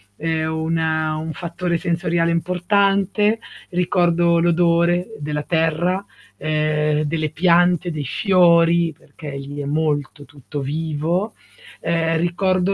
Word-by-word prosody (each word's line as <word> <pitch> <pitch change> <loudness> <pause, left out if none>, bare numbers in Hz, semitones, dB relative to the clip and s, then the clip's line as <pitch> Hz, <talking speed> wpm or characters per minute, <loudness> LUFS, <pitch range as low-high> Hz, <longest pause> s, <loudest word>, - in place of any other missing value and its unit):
è 160 +4 -1
una 160 0 -1
un 160 +1 -4
fattore 170 +2 -3
sensoriale 170 0 0
importante. 200 +4 +1 0.3
Ricordo 175 -1 +2
l'odore 170 +1 +2
della 150 0 -3
terra, 170 +4 0 0.3
ehm, 155 0 0
delle 155 0 -2
piante, 175 +2 +3
dei 150 -2 -4
fiori 170 - +3
perché 155 -2 -11
lì 140 +1 -7
è - - -5
molto 145 -1 -1
tutto 145 +1 -8
vivo. 160 +7 -2 0.5
Ehm, 165 0 0
ricordo 185 +2 +1
165 Hz, 110 wpm, -20 LUFS, 155-175 Hz, 0.5 s, piante